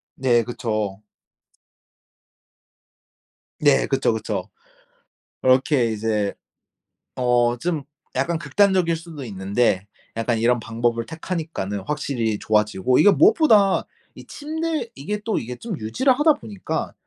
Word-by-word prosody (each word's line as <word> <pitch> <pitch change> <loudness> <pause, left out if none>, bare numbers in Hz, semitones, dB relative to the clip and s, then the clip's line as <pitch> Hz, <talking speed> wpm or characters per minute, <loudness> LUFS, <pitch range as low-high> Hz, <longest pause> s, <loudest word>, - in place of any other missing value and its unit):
네. 120 -3 +2
그쵸. 110 -4 -3 2.6
네. 145 -2 +4
그쵸, 135 -4 +1
그쵸. 110 -1 -4 0.9
그렇게 130 -1 +3
이제 105 -2 -1 0.8
어 120 -1 +2
좀 165 -5 -2 0.3
약간 160 +6 0
극단적일 170 +2 +2
수도 160 -4 -9
있는데 100 -1 0 0.3
약간 115 0 0
이런 120 +1 +2
방법을 115 0 -1
택하니까는 160 - -4
확실히 125 -8 -1
좋아지고 105 +2 +1
이게 205 - +7
무엇보다 300 - +4 0.3
이 - - -12
침대 310 -3 -3
이게 205 +9 -4
또 225 - 0
이게 125 +2 -6
좀 215 - -6
유지를 255 - +2
하다 310 0 +5
보니까 105 -4 -5
125 Hz, 240 characters per minute, -22 LUFS, 110-170 Hz, 2.6 s, 이게